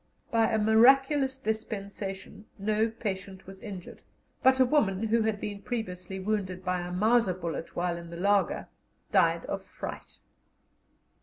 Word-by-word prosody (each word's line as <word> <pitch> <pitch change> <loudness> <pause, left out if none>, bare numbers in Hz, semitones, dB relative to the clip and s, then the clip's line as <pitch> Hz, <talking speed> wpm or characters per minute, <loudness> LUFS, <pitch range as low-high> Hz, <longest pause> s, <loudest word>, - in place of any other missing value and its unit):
By 225 -1 +3
a 220 - +2
miraculous 265 +5 +5
dispensation 205 -3 -5
no 215 +2 +1
patient 195 -4 -5
was 195 0 -11
injured, 195 -5 -9 0.4
but 260 0 +5
a 260 - +7
woman, 220 -8 +2
who 230 +1 +3
had 220 -2 0
been 205 -1 -5
previously 190 -5 -4
wounded 190 -2 -2
by 180 0 0
a 175 0 -5
Mauser 215 +1 +3
bullet 165 -3 -5
while 175 0 -1
in 170 0 -9
the 170 - -8
laager, 200 0 +1 0.4
died - - +3
of - - -4
fright. - - -8
205 Hz, 145 wpm, -29 LUFS, 185-225 Hz, 0.4 s, a